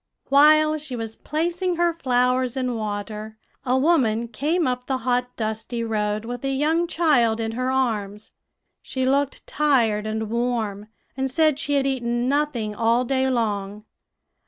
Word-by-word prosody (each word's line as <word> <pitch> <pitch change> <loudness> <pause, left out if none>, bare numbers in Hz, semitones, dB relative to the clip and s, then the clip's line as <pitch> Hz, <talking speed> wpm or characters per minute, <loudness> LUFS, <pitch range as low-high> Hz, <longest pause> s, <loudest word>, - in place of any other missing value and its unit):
"While 305 +2 +5
she 285 -4 -5
was 225 -1 -5
placing 345 +3 -2
her 345 0 +2
flowers 255 -3 +1
in 255 -1 -1
water, 215 0 -5 0.3
a 255 0 +1
woman 245 -7 +2
came 310 +9 0
up 250 0 -2
the 265 - 0
hot, 250 0 0
dusty 220 +2 -3
road, 210 -1 -1
with 245 +1 -6
a 270 - -1
young 315 +5 +1
child 245 -10 +2
in 225 0 -2
her 255 +3 -2
arms. 215 -6 -2 0.5
She 260 -1 -3
looked 275 +1 0
tired 235 -8 +1
and 220 0 -3
warm, 230 -4 -2 0.3
and 265 0 -1
said 305 +1 +2
she 290 - -1
had 275 -1 +2
eaten 240 -2 -1
nothing 270 -7 0
all 230 +3 +2
day 265 +1 +1
long. 210 -4 -2
250 Hz, 155 wpm, -23 LUFS, 220-280 Hz, 0.5 s, While